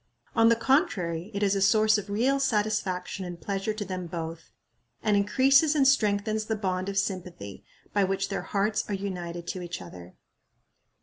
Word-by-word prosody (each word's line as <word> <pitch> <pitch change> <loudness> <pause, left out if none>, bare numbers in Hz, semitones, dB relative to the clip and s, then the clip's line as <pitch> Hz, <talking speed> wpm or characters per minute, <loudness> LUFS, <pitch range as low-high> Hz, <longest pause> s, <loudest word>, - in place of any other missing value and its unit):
On 225 0 +6
the 230 - +5
contrary, 215 - 0
it 200 -1 -2
is 200 -1 +3
a 195 - 0
source 215 +1 +4
of 205 0 -9
real 250 +7 +1
satisfaction 210 -6 -1
and 175 -1 -7
pleasure 195 +3 -2
to 215 -1 -4
them 185 -1 -5
both, 165 -1 -6 0.5
and 210 -2 +3
increases 270 +9 +4
and 275 -3 +4
strengthens 215 -4 +2
the 220 - -1
bond 190 -2 -2
of 195 - -4
sympathy 180 - -4 0.3
by 205 - +3
which 195 0 -1
their 195 - -2
hearts 205 +2 0
are 205 - 0
united 175 -3 -5
to 185 - -4
each 175 -1 -5
other. 90 0 -11
200 Hz, 175 wpm, -27 LUFS, 180-215 Hz, 0.5 s, On